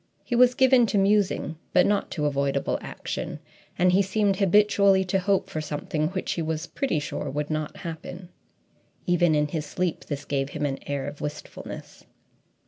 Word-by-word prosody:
He 240 - -2
was 250 +1 +5
given 260 -3 +5
to 205 - 0
musing 195 -5 +2 0.2
but 180 - +5
not 205 -1 +1
to 150 -4 -2
avoidable 140 -1 0
action, - - -5 0.4
and 180 +1 +4
he 190 +2 +4
seemed 200 0 +1
habitually 200 0 +4
to 190 +1 +1
hope 190 0 +1
for 190 -5 -4
something 155 +1 -2
which 185 +2 -3
he 170 - -1
was 160 0 -2
pretty 270 - -1
sure 145 -1 -3
would 145 +2 -3
not 155 -1 -3
happen. 175 +2 -7 0.8
Even 175 -2 +3
in 150 0 +1
his 155 -1 -3
sleep, 180 +1 -2
this 145 -1 -5
gave 135 -1 -1
him 145 - -3
an 135 -1 -2
air 140 -1 -2
of 145 - -7
wistfulness. 150 0 -7
175 Hz, 175 wpm, -26 LUFS, 150-195 Hz, 0.8 s, was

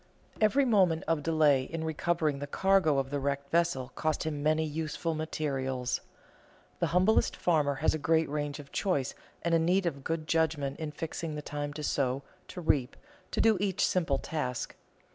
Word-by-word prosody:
Every 265 +6 +4
moment 190 -9 +3
of 165 -2 +1
delay 150 -3 +4
in 160 +4 -5
recovering 160 -2 0
the 145 - -4
cargo 190 -2 +3
of 135 0 -1
the 145 - -1
wrecked 140 0 -2
vessel 165 -7 +1
cost 155 +2 -1
him 150 -3 -3
many 155 +1 +2
useful 160 +2 -2
materials. 135 -5 -2 0.8
The - - +2
humblest 185 +5 +3
farmer 150 -5 +2
has 145 +4 +2
a 155 - -2
great 160 +2 +2
range 145 0 -3
of 145 -2 -11
choice 145 -10 0 0.3
and 170 0 +1
a 165 - +5
need 180 +4 +2
of 140 -5 -2
good 160 +1 -2
judgment 155 -4 0
in 155 -1 -3
fixing 160 0 -4
the 150 - -5
time 145 0 -4
to 150 - -6
sow, 135 -1 0 0.2
to 180 - -7
reap, 140 -5 +1 0.3
to - - -3
do 220 -2 +5
each 195 -2 +1
simple 165 -7 +1
task. 130 -5 -3
155 Hz, 180 wpm, -30 LUFS, 140-165 Hz, 0.8 s, a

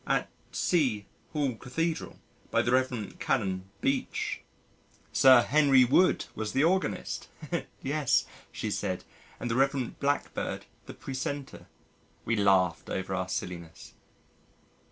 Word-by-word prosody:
"At - - +1 0.2
C 130 - +1 0.3
Hall 145 -5 0
Cathedral, 160 +8 -3 0.3
by - - +2
the 120 - 0
Rev. 125 -4 0
Canon 95 -6 -1
Beech...." 135 0 -1 0.7
"Sir 130 -3 +8
Henry 140 -3 +5
Wood 175 +9 +4
was 110 -1 -4
the 135 - +3
organist." 185 +3 0 0.6
"Yes," 145 -1 +2 0.3
she - - -3
said, - - -2 0.4
"and 120 - -3
the - - +1
Rev. 135 -1 +1
Blackbird 145 +1 -1 0.2
the - - -8
precentor." 135 +1 -5 0.6
We 115 - +1
laughed 95 -5 +3
over 95 0 -3
our 95 -1 -2
silliness! 85 -3 -6
130 Hz, 115 wpm, -29 LUFS, 100-140 Hz, 0.7 s, Sir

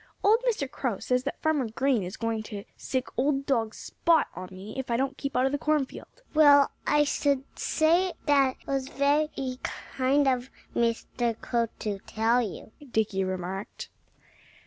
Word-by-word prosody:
"Old 430 +3 +5
Mr. 355 - -1
Crow 255 -6 -2
says 250 +4 0
that 280 - -3
Farmer 300 -7 +1
Green 260 +1 +1
is 180 0 -6
going 230 -1 -1
to 205 -2 -6
sick 260 -1 -2
old 275 +1 +1
dog 225 -5 0
Spot 330 -2 +2
on 185 +1 -7
me 190 +3 -9
if 265 -1 -4
I 235 - +2
don't 270 +1 -1
keep 275 -2 -5
out 255 - +3
of 270 - +1
the 285 - -1
cornfield." 300 -3 -1 0.3
"Well, 290 -2 +7 0.2
I 295 0 +4
should 280 -2 +1 0.2
say 335 +4 +3 0.2
it 275 -3 +4
was 270 -1 -1
very 280 -2 0
kind 270 +2 0
of 255 -1 +1 0.3
Mr. 235 0 0
Crow 235 -1 0
to 205 -2 -3
tell 225 +4 +1
you," 215 -1 -6 0.2
Dickie 210 -4 +1
remarked. 185 +1 -5
260 Hz, 165 wpm, -27 LUFS, 225-285 Hz, 0.3 s, Well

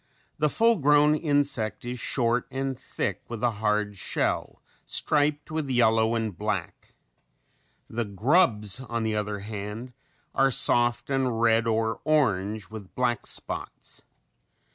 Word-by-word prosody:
The 150 0 +3
full 230 +7 +3
grown 150 0 +4
insect 145 - 0
is 125 0 -4
short 120 0 0
and 135 0 -3
thick 130 - -4
with 115 0 -6
a 120 - +3
hard 105 -1 0
shell, - - -2 0.2
striped 150 0 0
with 155 -3 -2
yellow 115 -2 +3
and 110 -4 -2
black. - - -4 0.9
The 115 +1 -3
grubs, 105 - +2
on 120 -3 -3
the 110 -1 -1
other 105 -1 -2
hand, 105 +4 -6 0.4
are 135 0 +3
soft 120 0 +2
and 130 -4 0
red 115 0 +3
or 110 0 0
orange 110 -9 0
with 105 -4 -10
black 120 -2 0
spots. - - -5
120 Hz, 130 wpm, -26 LUFS, 110-135 Hz, 0.9 s, grown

